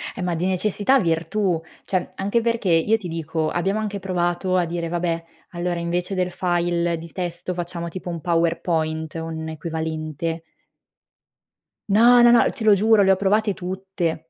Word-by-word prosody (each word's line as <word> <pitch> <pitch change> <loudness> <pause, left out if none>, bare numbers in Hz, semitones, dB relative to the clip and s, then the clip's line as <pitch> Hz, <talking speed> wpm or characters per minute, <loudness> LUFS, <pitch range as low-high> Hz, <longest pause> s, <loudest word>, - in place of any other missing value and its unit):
Eh - - -5
ma 180 -1 -1
di 175 +3 -1
necessità 205 +7 +2
virtù. 170 +1 0 0.2
Cioè 185 -2 -1
anche 205 +4 0
perché 230 -5 0
io 165 +7 +4
ti 190 -5 -7
dico, 160 -1 -2
abbiamo 195 +5 0
anche 205 -2 -3
provato 180 0 -1
a 180 - +3
dire: 170 0 -3
"Vabbè, 170 -1 -1 0.3
allora 175 0 -2
invece 175 +3 -2
del 180 -1 0
file 175 -1 0
di 165 0 -9
testo 180 0 -4
facciamo 170 -1 -4
tipo 180 +1 -7
un 170 -2 -5
powerpoint, 165 -2 0
un 160 -1 -5
equivalente". 160 0 -4 1.5
No, 240 +3 +7
no, 240 0 +7
no, 240 - +6
te 235 - -7
lo 215 -1 +6
giuro, 215 +1 +4
le 195 0 +5
ho - - +5
provate 205 +1 +1
tutte. 180 -3 -4
175 Hz, 165 wpm, -22 LUFS, 165-195 Hz, 1.5 s, No